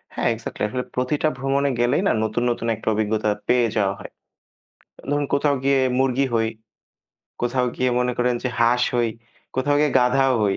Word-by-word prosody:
হ্যাঁ - - +1
এক্সাক্টলি। 115 -1 -6
আসলে 125 +3 -3
প্রতিটা 130 +5 0
ভ্রমণে 135 +2 0
গেলেই 120 +7 +2
না - - +3
নতুন, 115 +2 -1
নতুন 115 -1 -3
একটা 110 - -15
অভিজ্ঞতা 110 0 0 0.2
পেয়ে 125 -1 +3
যাওয়া 100 -2 +2
হয়। - - -10 1.0
ধরুন 145 0 +1
কোথাও 140 0 +2
গিয়ে 140 0 +3 0.2
মুরগি 135 +1 +2
হই। 110 -1 +2 0.9
কোথাও 125 +1 +1
গিয়ে 130 0 +1
মনে 125 0 +1
করেন 125 0 +2
যে 130 - 0
হাঁস 120 +1 +3
হই, 120 -1 +2 0.5
কোথাও 145 +2 +2
গিয়ে 150 -1 +3
গাধাও 130 +1 +3
হই। 100 -2 +1
125 Hz, 170 wpm, -22 LUFS, 115-135 Hz, 1.0 s, না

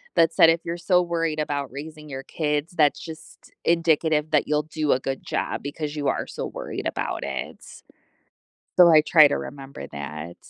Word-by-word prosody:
that 165 0 +4
said, 165 - +7
"If 165 0 +2
you're 170 +1 -3
so 180 +1 +3
worried 165 -3 -1
about 145 -3 -2
raising 150 +2 -9
your 135 -1 -6
kids, 150 0 -2
that's 150 -4 +3
just 160 -1 -12
indicative 160 -2 +2
that 150 - +2
you'll 150 0 +1
do 155 -1 -2
a 130 - +3
good 135 0 -4
job, - - -3
because 145 +1 -5
you 145 -2 -2
are - - 0
so - - -5
worried - - -5
about - - -3
it." - - -5 1.2
So, 180 -1 +8
I 160 -2 +7
try 155 -1 +7
to 145 - -1
remember 140 -1 -8
that. 75 +4 -7
150 Hz, 185 wpm, -24 LUFS, 145-165 Hz, 1.2 s, So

